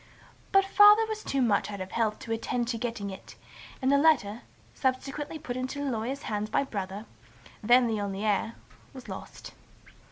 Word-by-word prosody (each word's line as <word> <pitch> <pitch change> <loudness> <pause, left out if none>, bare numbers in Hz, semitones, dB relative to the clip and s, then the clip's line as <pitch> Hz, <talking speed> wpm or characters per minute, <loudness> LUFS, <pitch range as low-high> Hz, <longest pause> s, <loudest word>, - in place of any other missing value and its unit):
But 390 0 +5
Father 415 +3 +7
was 435 -1 -5
too 275 -2 0
much 210 -4 +1
out 200 -1 -6
of 185 0 -6
health 220 -2 0
to 245 -3 -7
attend 235 +1 -1
to 235 - -1
the - - -11
getting 230 -5 -3
it; 190 - -11 0.5
and 260 - +3
the 280 - +5
letter, 245 -8 +3 0.3
subsequently 275 +4 -2
put 265 -5 -6
into 255 +3 -4
a - - 0
lawyer's 245 +5 -3
hands 210 0 -3
by 250 - +1
Brother, 200 -4 -5 0.6
then 245 +3 +5
the 220 -3 -1
only 200 +1 -3
heir, 215 +2 0 0.4
was 260 - -10
lost. - - -9
240 Hz, 185 wpm, -28 LUFS, 210-275 Hz, 0.6 s, Father